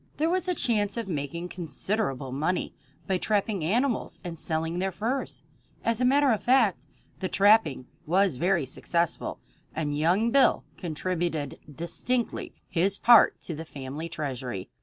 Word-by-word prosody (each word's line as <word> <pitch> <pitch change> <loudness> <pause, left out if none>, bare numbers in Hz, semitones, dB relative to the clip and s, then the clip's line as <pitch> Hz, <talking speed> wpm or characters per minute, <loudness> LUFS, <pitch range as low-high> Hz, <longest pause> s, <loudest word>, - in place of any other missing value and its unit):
There 320 +3 +1
was 370 0 0
a 360 - +1
chance 210 -6 0
of 230 -3 -3
making 170 +2 -4
considerable 165 - -2
money 155 +7 -1 0.3
by 190 -1 0
trapping 205 -3 0
animals 235 - 0
and 170 -3 -6
selling 160 +2 -2
their 190 +1 0
furs. 240 +8 -3 0.4
As 230 +1 +1
a - - +4
matter 275 +1 +4
of 220 - +1
fact, 240 -7 +3 0.3
the 185 - -2
trapping 195 - +4 0.2
was 185 -3 +2
very 170 0 +2
successful, 170 +5 -2 0.4
and 150 -2 -1
young 180 +10 +2
Bill 275 +1 +4
contributed 165 -3 -3
distinctly 200 - -2 0.2
his 190 +3 +1
part 235 -2 +6
to 170 - -5
the 160 +1 -6
family 145 +2 -6
treasury. 130 - -4
180 Hz, 145 wpm, -27 LUFS, 155-220 Hz, 0.4 s, part